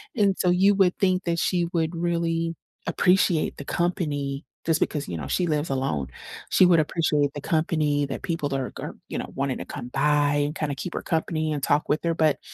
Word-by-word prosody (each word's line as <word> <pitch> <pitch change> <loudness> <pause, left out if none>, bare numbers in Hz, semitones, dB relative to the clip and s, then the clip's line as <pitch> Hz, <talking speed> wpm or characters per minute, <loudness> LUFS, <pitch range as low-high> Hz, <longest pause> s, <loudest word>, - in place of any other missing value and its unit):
and 200 -4 +2
so 180 - +2
you 195 +3 +4
would 190 -2 +3
think 185 -1 +2
that 170 -1 0
she 175 -2 +1
would 160 0 0
really 165 -1 -1 0.3
appreciate 180 -1 +2
the 140 - -7
company, 145 -6 -1 0.2
just 160 -1 +2
because, 150 -2 -1
you 85 - -4
know, 70 -3 -5
she 180 - +1
lives 150 0 0
alone. 105 - -1 0.4
She 185 - +6
would 175 -2 +5
appreciate 150 -2 +1
the 145 - -5
company 155 -3 +1
that 135 - -5
people 150 -4 -2
are 130 -2 -2
are, - - -6
you - - -3
know, - - -6
wanting 135 -1 -1
to - - -5
come 125 -4 -7
by 145 +2 +2
and 150 +2 -4
kinda 150 -2 -2
keep 170 +5 -5
her - - -2
company 160 -1 -1
and 145 - -3
talk 145 +1 +2
with 150 - +1
her, 170 -1 +1
but 155 -5 +2
155 Hz, 210 wpm, -25 LUFS, 145-170 Hz, 0.4 s, She